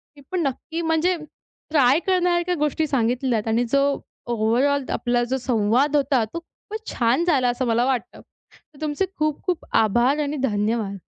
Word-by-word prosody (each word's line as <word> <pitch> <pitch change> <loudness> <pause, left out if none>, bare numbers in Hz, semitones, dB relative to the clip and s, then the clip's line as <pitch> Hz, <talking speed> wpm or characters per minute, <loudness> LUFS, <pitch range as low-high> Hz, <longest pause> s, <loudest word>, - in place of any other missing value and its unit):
मी 285 - -15
पण 365 - 0
नक्की 325 +5 -4
म्हणजे 325 +3 +1 0.6
ट्राय 280 0 +4
करण्यासारख्या 355 -1 +2
गोष्टी 300 +1 0
सांगितल्यात 245 -3 0
आणि 225 +2 +2
जो 275 0 +4 0.5
ओव्हरऑल 250 +6 +2
आपला 240 0 0
जो 260 +2 -1
संवाद 245 +4 +1
होता 270 -4 +2
तो 335 - -3
खूपच 430 +6 -11
छान 245 +7 +1
झाला 260 -8 +3
असं 245 +2 -1
मला 235 +2 +2
वाटतं. 260 -3 -2 0.3
तर 295 -1 -22
तुमचे 305 +5 0
खूप-खूप 310 +3 -1 0.2
आभार 240 +7 +2
आणि 290 +1 -3
धन्यवाद. 205 -2 -1
270 Hz, 150 wpm, -23 LUFS, 240-315 Hz, 0.6 s, ट्राय